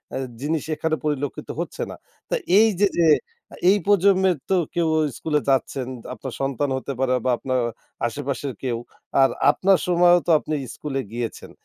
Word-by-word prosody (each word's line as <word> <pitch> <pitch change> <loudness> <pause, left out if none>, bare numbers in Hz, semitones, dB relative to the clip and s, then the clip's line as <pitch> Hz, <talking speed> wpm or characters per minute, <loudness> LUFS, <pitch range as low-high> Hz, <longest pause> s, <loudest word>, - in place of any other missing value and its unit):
এহ 135 - -2 0.2
জিনিস 155 +1 -1
এখানে 155 +1 0
পরিলক্ষিত 145 -1 -3
হচ্ছে - - -4
না। - - -7 0.3
তা - - +1 0.2
এইযে 205 -2 +4
যে 165 - +5 0.6
এই 205 - +5
প্রজন্মের 190 -3 +4
তো 190 - +3 0.2
কেউ 170 -2 +2 0.3
স্কুলে 150 -2 0
যাচ্ছেন, 135 -1 0 0.3
আপনার 130 -1 -7
সন্তান 135 +1 -1
হতে 140 - -4
পারে 130 -1 +2
বা, 130 - +3
আপনার 130 0 -1 0.5
আশেপাশের 140 +2 -4
কেউ। 120 -3 -1 0.4
আর 135 - +6 0.2
আপনার 190 +4 +3
সময়ও 175 0 +5
তো - - +4
আপনি 155 - -3 0.2
স্কুলে 135 -3 -3
গিয়েছেন। 120 -1 -5
150 Hz, 155 wpm, -23 LUFS, 135-175 Hz, 0.6 s, আর